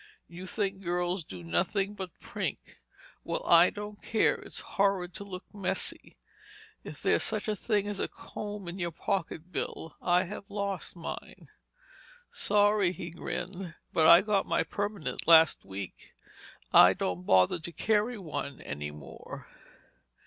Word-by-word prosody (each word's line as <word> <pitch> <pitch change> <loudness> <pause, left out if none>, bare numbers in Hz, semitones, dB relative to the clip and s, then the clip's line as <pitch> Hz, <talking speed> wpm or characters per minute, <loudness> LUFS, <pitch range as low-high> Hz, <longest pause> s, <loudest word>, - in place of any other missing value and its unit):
You 180 +2 -9
think 195 0 -2
girls 175 0 -1
do 90 - -9
nothing 195 - 0
but 190 -2 -5
prink. - - -5 0.4
Well, - - -2
I - - +7
don't 210 0 -8
care—it's 220 - 0
horrid 195 -3 0
to 200 - -6
look 185 -2 -7
messy. 200 -3 -2 0.7
Is - - -9
there - - +4
such 215 -1 -2
a 215 - 0
thing 205 0 0
as 205 -1 -3
a - - 0
comb 205 -3 -7
in 175 +3 -6
your 175 -1 0
pocket, 170 -1 -3
Bill? 160 -1 -4
I 180 0 +3
have 200 +2 -8
lost 200 -3 -3
mine." 170 - -8 0.8
"Sorry," 205 -2 +3
he 175 -2 -7
grinned, 175 +1 -5 0.2
"but 160 -1 +5
I 170 +2 +10
got 205 -2 +1
my - - +2
permanent 205 -4 -3
last 160 -1 +7
week. 95 -1 -8 0.6
I - - +9
don't 90 0 -3
bother 95 - +5
to 170 +2 -6
carry 215 +7 +1
one 155 -7 -5
any 75 0 -5
more." 75 -1 -10
185 Hz, 145 wpm, -30 LUFS, 165-205 Hz, 0.8 s, I